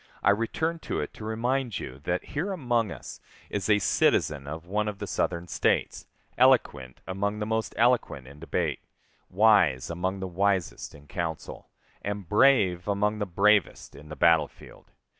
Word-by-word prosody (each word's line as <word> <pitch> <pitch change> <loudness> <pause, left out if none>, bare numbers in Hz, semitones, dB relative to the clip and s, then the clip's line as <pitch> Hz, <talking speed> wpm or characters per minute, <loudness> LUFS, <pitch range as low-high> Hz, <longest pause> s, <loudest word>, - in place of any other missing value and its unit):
I - - +5
return 160 +10 -1
to - - -4
it - - -4
to - - -11
remind 120 +2 -1
you 65 +1 -8
that 90 0 -1
here 160 +8 -2
among 120 - 0
us - - -9 0.3
is 100 0 -2
a 105 - +5
citizen 75 -7 +1
of 80 +3 -7
one 105 +4 -1
of 105 -1 -4
the - - -5
Southern 85 0 -2
States, - - 0 0.3
eloquent 65 -3 +2
among 100 +2 -2
the 105 - -3
most 110 0 -2
eloquent 120 - +1
in 70 +3 -13
debate, 85 - -2 0.5
wise 90 - +3
among 95 +3 -2
the 95 - -4
wisest 95 -7 -1
in 70 0 -15
council, 80 -1 -5 0.3
and 100 -2 -5
brave 105 -6 +3
among 105 +1 0
the 105 - -2
bravest 100 +2 +2
in 75 +2 -13
the 80 - -7
battle 80 0 +4
field. - - -17
100 Hz, 165 wpm, -27 LUFS, 85-110 Hz, 0.5 s, I